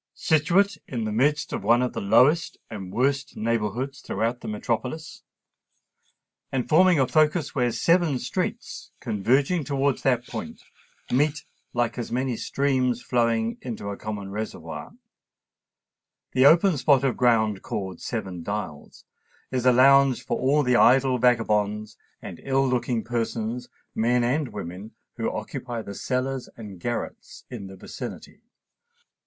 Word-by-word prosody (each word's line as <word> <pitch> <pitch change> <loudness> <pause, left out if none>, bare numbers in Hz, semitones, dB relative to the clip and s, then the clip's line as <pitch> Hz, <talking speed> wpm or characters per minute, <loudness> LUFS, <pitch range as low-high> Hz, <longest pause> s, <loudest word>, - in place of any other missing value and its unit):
Situate 180 +6 +2
in 120 -3 -3
the 110 - -2
midst 145 +7 +1
of - - -3
one 120 +2 +4
of 125 - -2
the - - -4
lowest 140 +11 +3
and 95 -4 -7
worst 135 +4 0
neighbourhoods 115 +4 -2
throughout 115 +2 -2
the - - -7
metropolis, 125 +8 -3 1.3
and 130 -2 -1
forming 175 +2 +5
a 130 - +3
focus 155 +1 +2
where 125 -3 +1
seven 165 0 +2
streets, - - -4
converging 135 - +1
towards 140 0 0
that 125 -3 +1
point, - - -7 0.5
meet 145 +4 +1 0.3
like 120 0 -1
as 120 - -5
many 125 0 -1
streams 130 -2 0
flowing 115 -2 0
into 115 -5 -5
a - - -4
common 100 -2 -6
reservoir, 110 +2 -6 1.4
the 130 +2 +5
open 170 +2 +5
spot 140 0 +3
of 135 -3 +1
ground 110 -5 +2
called 95 -4 -5
Seven 95 -7 -4
Dials 100 -6 -6 0.5
is 130 -1 0
a - - +8
lounge 135 +1 +5
for - - -2
all 145 +3 +3
the 125 -2 +2
idle 130 0 +4
vagabonds 105 -3 +1 0.3
and 85 - -8
ill 135 0 +1
looking 120 -2 0
persons, 115 +1 -3 0.2
men 120 +2 +2
and 140 +5 0
women, 100 +1 -8 0.2
who - - -1
occupy 120 -3 -5
the 100 - -7
cellars 130 +4 -2
and 105 -5 -9
garrets 120 +5 -5
in 110 -6 -6
the 95 - -10
vicinity. 95 - -9
125 Hz, 140 wpm, -25 LUFS, 110-135 Hz, 1.4 s, a